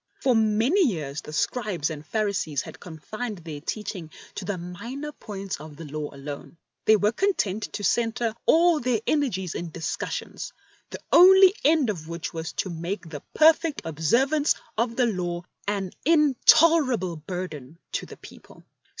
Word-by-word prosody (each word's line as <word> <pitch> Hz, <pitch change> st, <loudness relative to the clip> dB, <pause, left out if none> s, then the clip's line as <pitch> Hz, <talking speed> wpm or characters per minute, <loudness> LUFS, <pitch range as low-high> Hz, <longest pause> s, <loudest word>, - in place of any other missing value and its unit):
For 260 Hz, -, +2 dB
many 225 Hz, -, +3 dB
years 150 Hz, -, -3 dB
the -, -, -10 dB
Scribes 180 Hz, -, -1 dB
and 150 Hz, -1 st, -7 dB
Phari 210 Hz, +4 st, -1 dB
sees 150 Hz, -7 st, -2 dB
had -, -, -11 dB
confined 210 Hz, +7 st, -6 dB
their 160 Hz, -4 st, -8 dB
teaching 190 Hz, -2 st, -5 dB, 0.2 s
to 190 Hz, -, -6 dB
the 200 Hz, 0 st, -2 dB
minor 235 Hz, +12 st, -6 dB
points 200 Hz, -, -6 dB
of 150 Hz, 0 st, -10 dB
the 165 Hz, +2 st, -9 dB
Law 150 Hz, 0 st, -5 dB
alone. 140 Hz, +3 st, -8 dB, 0.3 s
They 220 Hz, -, +7 dB
were 210 Hz, 0 st, +2 dB
content 220 Hz, -, -1 dB
to 205 Hz, -, -5 dB
centre 230 Hz, +1 st, +1 dB
aU 335 Hz, -1 st, +5 dB
their 245 Hz, -4 st, 0 dB
energies 215 Hz, -, 0 dB
in 170 Hz, -, -5 dB
discussions, 160 Hz, 0 st, -5 dB, 0.4 s
the -, -, -8 dB
only 380 Hz, +1 st, +8 dB
end 295 Hz, -6 st, +4 dB
of 160 Hz, -6 st, -8 dB
which 170 Hz, -1 st, -5 dB
was 160 Hz, -1 st, -4 dB
to 190 Hz, -, -3 dB
make 170 Hz, +2 st, -5 dB
the 145 Hz, -3 st, -7 dB
perfect 315 Hz, 0 st, +4 dB
observance 240 Hz, -, +2 dB, 0.2 s
of 230 Hz, +1 st, -1 dB
the 250 Hz, -, +3 dB
Law 175 Hz, -5 st, -2 dB, 0.2 s
an 200 Hz, -3 st, -2 dB
intolerable 295 Hz, -, +4 dB
burden 155 Hz, -4 st, -7 dB
to -, -, -3 dB
the -, -, -11 dB
people. -, -, -15 dB
205 Hz, 160 wpm, -25 LUFS, 165-255 Hz, 0.4 s, only